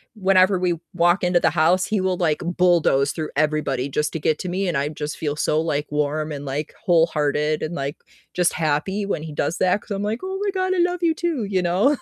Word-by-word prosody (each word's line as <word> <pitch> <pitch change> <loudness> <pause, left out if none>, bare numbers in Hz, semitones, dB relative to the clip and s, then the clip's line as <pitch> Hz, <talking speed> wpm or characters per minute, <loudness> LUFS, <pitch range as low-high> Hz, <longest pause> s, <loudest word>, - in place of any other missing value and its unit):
whenever 190 -1 +3
we 180 -1 +1 0.2
walk 175 +2 +2
into 180 -1 +3
the - - +3
house, 170 +4 +2
he 210 -3 -1
will, 185 -1 0
like, 160 -4 +1 0.2
bulldoze 165 -6 +3
through 155 -1 -4
everybody 150 -4 0
just 150 +2 -1
to 160 - -4
get 155 +1 +1
to 180 - -5
me, 190 +1 -1
and 170 - 0
I 140 +2 0
just 150 0 -5
feel 150 -2 -3
so, 155 +1 +1
like, 150 -2 -2
warm 150 +1 -1
and, 145 -1 -6
like, 140 +3 -4
wholehearted 155 -3 +2
and, 155 - -3
like, 140 -2 -3 0.4
just 180 -1 +2
happy 165 +6 -1
when 195 -6 -2
he 160 - -7
does 145 +4 -2
that 185 +2 +2
'cause - - -17
I'm 200 0 -2
like, 215 +3 -2
"Oh 380 +1 -4
my 405 - 0
god, 375 -1 0
I - - 0
love 355 0 +1
you 330 - +3
too," 320 -8 -2
you 195 -2 0
know? 185 +12 +2
170 Hz, 235 wpm, -22 LUFS, 150-195 Hz, 0.4 s, whenever